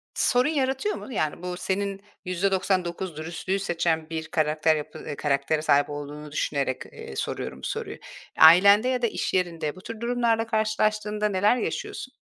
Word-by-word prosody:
sorun 250 +3 +3
yaratıyor 270 +6 0
mu? - - -9
Yani, 155 -5 -1
bu 180 0 -4
senin 195 +1 -2 0.2
%99 185 -2 -1
dürüstlüğü 170 +5 -3
seçen 165 -4 -1
bir 160 -1 -4
karakter 155 0 +2
yapı 150 -1 -6
eee, 145 - -4
karaktere 145 +2 0
sahip 145 -1 +3
olduğunu 145 0 -7
düşünerek, 140 -3 -1
eee, 65 - -10
soruyorum - - -4
bu - - -3
soruyu. - - -4 0.4
Ailende 200 +8 +8
ya 255 -1 0
da 235 - +3
iş - - -3
yerinde 165 -5 -1
bu 185 - -12
tür 230 +2 -8
durumlarla 235 -2 +1
karşılaştığında 215 -1 0
neler 205 +5 +3
yaşıyorsun? 260 +1 -4
185 Hz, 155 wpm, -26 LUFS, 155-215 Hz, 0.4 s, Ailende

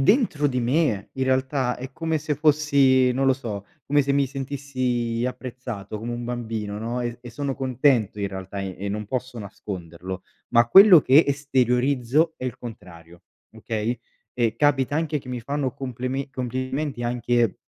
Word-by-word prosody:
dentro 160 - +3
di 125 -2 0
me 120 - +1
in 130 0 -2
realtà 130 -1 0
è 130 +1 -7
come 160 +2 -1
se 150 0 -2
fossi 140 -4 +4
non 135 +2 0
lo 135 - +6
so, 110 -7 -5 0.2
come 145 0 +3
se 140 +1 0
mi 140 -1 +2
sentissi 130 -4 -2
apprezzato 125 -5 -6
come 120 +2 -4
un 120 0 -4
bambino, 110 -4 -4
no, 120 +3 -3
e 120 0 -3
e 120 - -9
sono 140 +2 -3
contento 125 -5 +1
in 100 - -1
realtà 95 +1 -6
e 95 +1 -5
non 105 0 -4
posso 130 +1 -4
nasconderlo, 95 -3 -7 0.3
ma 120 -1 +4
quello 195 - +9
che 140 +4 +6
esteriorizzo 135 +2 +1
è - - -7
il 125 -3 -4
contrario, 85 -7 -11 0.3
okay, 110 +1 -3 0.4
e 115 -2 +1
capita 145 +1 +2
anche 160 -2 0
che 125 -1 -10
mi 125 -1 -4
fanno 140 0 -2
compleme 130 +1 -4
complimenti 130 +1 -3
anche 120 -2 +1
125 Hz, 165 wpm, -24 LUFS, 115-140 Hz, 0.4 s, quello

